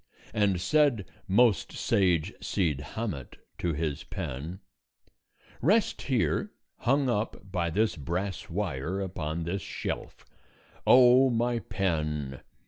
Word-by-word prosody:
And 100 -4 +2
said 120 - +3 0.2
most 110 +1 +3
sage 90 -1 +1
Cid 80 -8 0
Hamet 100 - -4 0.2
to 85 - 0
his 75 -2 -2
pen: 75 +9 -5 1.0
"Rest 200 - +2
here, 135 - 0 0.3
hung 135 +2 +2
up 105 -4 -2
by 85 -3 0
this 105 +7 +1
brass 95 +6 -3
wire, 90 -2 -2
upon 85 -4 -3
this 90 +4 -2
shelf. - - -5 0.6
O 130 +1 +7
my 120 0 +1
pen! 75 - -2
95 Hz, 110 wpm, -28 LUFS, 80-115 Hz, 1.0 s, O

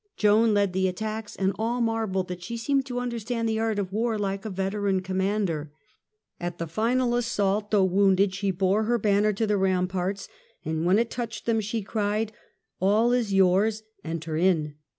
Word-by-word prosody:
Joan 215 +1 +4
led 200 -2 +2
the 190 0 +1
attacks 215 +3 -4
and 190 0 0
all 235 +3 0
marvelled 220 -5 0
that 180 -1 -6
she 235 +7 -5
seemed 270 +3 0
to 250 -1 -4
understand 235 -1 -2
the 220 0 0
art 225 -1 0
of 195 -2 -3
war 225 +1 0
like 195 0 -3
a - - -2
veteran 195 0 -1
commander. 190 -5 -1 0.7
At 175 0 -4
the 170 - -3
final 240 +8 0
assault, 210 -3 0
though 205 -3 +3
wounded, 190 +1 +3
she 195 +1 -1
bore 190 +3 +1
her 240 +2 +2
banner 210 0 +2
to 220 +3 0
the 210 -1 +1
ramparts, 185 0 0 0.4
and 160 +2 -1
when 185 +3 +5
it 230 +1 0
touched 235 -2 -5
them 225 -1 +1
she 215 +1 -3
cried: 210 +1 -1 0.3
" - - -54
All 215 +5 +3
is 240 -4 +1
yours, 195 +3 +3 0.2
enter 165 -1 -4
in 160 -3 +2
205 Hz, 185 wpm, -26 LUFS, 190-225 Hz, 0.7 s, when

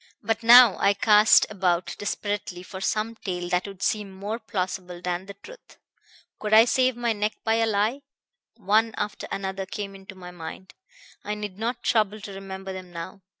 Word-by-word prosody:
"But 225 +1 -1
now 235 -1 +8
I 200 - +3
cast 210 +1 +6
about 185 -3 0
desperately 205 -3 -4
for 190 0 -9
some 215 +2 -1
tale 180 -4 -4
that 180 +2 0
would 195 -1 -8
seem 210 -2 0
more 205 +4 -5
plausible 185 -4 -4
than 180 +1 -3
the 200 - -9
truth. - - -15 0.6
Could 215 0 +2
I 225 +1 +8
save 255 0 +2
my 240 -1 0
neck 210 0 -1
by 225 0 +2
a 225 0 +2
lie? 220 +6 0 0.5
One 220 +1 +1
after 210 0 -4
another 195 0 -4
came 200 0 -6
into 195 0 -12
my 180 -1 -10
mind; 175 +2 -9 0.5
I 210 +1 -3
need 210 -2 -7
not 240 +2 -3
trouble 215 -2 +1
to 200 -1 -8
remember 190 0 -7
them 185 -1 -9
now. 175 +3 -8
200 Hz, 180 wpm, -25 LUFS, 190-220 Hz, 0.6 s, now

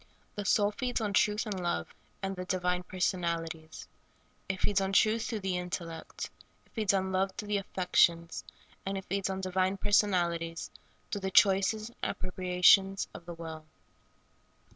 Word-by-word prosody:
The 205 -2 -5
soul 205 +1 +3
feeds 245 +3 -2
on 210 -3 -2
truth 210 +3 +2
and 205 -4 -3
love, 130 - -2 0.3
and 195 0 -2
the 180 - -4
di 185 +1 -1
vine 180 0 0
personalities. 170 -3 -3 0.6
It 190 -1 -2
feeds 200 -1 +2
on 195 0 -1
truth 220 +3 +4
through 220 -3 -3
the 190 -1 -1
in 180 0 -4
tellect; 165 -2 -5 0.4
it - - -30
feeds 215 -4 +2
on 190 -1 0
love 190 +1 +1
through 210 0 -7
the 205 - +2
affections; 175 -3 +2 0.4
and 195 0 -2
it 190 - -6
feeds 195 0 -1
on 190 0 -3
divine 185 +1 0
personalities 175 -5 +1 0.4
through 205 - -2
the 190 - -1
choices 205 +2 +4
and 235 - -22
appropriations 185 +1 +3
of 170 - -11
the 170 - -6
will. 160 -1 -7
190 Hz, 165 wpm, -31 LUFS, 180-200 Hz, 0.6 s, truth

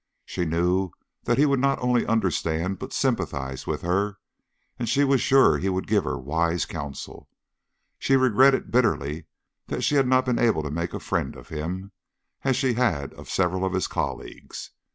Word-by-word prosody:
She 90 - -3
knew 90 +3 +1 0.4
that - - +2
he 145 - +5
would 140 -2 +2
not 135 +1 +2
only 125 -1 +1
understand 90 -3 0
but - - -7
sympathize 65 -1 -2
with - - -3
her, 95 +3 0 0.6
and 120 -2 -2
she 140 +4 +3
was 135 -2 +3
sure 135 0 +5
he 95 - 0
would 95 0 -1
give 105 -5 +1
her - - -2
wise 80 +4 0
counsel. 70 -1 -7 0.7
She 135 - +2
regretted 130 +1 +4
bitterly 100 - +1 0.4
that - - -3
she - - +2
had 135 -3 +4
not 130 0 +3
been 125 -2 0
able 110 -10 +2
to 75 - -4
make 85 +3 -3
a - - -3
friend - - -2
of - - -13
him, 90 +6 -5 0.5
as 130 -2 +2
she 130 -1 +1
had 110 - 0
of - - -12
several 95 0 0
of 95 -1 -1
his 95 -2 0
colleagues. - - -5
95 Hz, 180 wpm, -25 LUFS, 85-125 Hz, 0.7 s, he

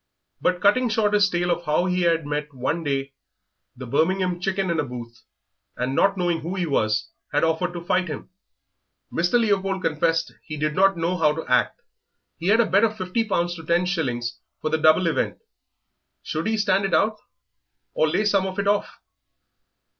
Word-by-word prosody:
But 180 0 +1
cutting 240 +5 +3
short 215 -2 +1
his 205 -1 +4
tale 175 0 0
of 170 0 -2
how 155 +3 +1
he 180 0 0
had 165 -2 +2
met 150 0 -4
one 130 +7 -2
day 135 -2 -2 0.6
the 130 - -8
Birmingham 180 +7 0
Chicken 190 0 -1
in 165 - 0
a - - +2
booth, 120 -3 -8 0.6
and, 125 +1 -1
not 195 +6 +2
knowing 175 -2 0
who 175 +4 -5
he 180 -2 -1
was, 110 -8 0 0.2
had 145 - +1
offered 165 +2 0
to 170 -1 -7
fight 185 +1 +1
him, 150 +3 -7 0.8
Mr. 175 +8 +2
Leopold 195 -4 0
confessed 165 +1 0
he 155 - -7
did 150 +1 -1
not 195 +2 +3
know 170 +2 -1
how 155 -3 +3
to 160 - -5
act 125 - +1 0.6
he 170 - -3
had 220 +3 +4
a 235 - +5
bet 200 +2 +3
of 215 -1 +1
fifty 185 +4 -1
pounds 175 -5 -1
to 165 - -9
ten 170 +3 +1
shillings 120 -10 -2 0.2
for 155 - -3
the 160 - +1
double 155 +3 +5
event; 165 - 0 0.9
should 160 +6 -3
he 220 0 0
stand 200 -2 +2
it 195 - +1
out 215 +1 +1 0.7
or 155 - +2
lay 190 +7 0
some 200 -2 +2
of 190 0 -6
it 200 0 -1
off? 205 0 0
175 Hz, 190 wpm, -23 LUFS, 155-195 Hz, 0.9 s, a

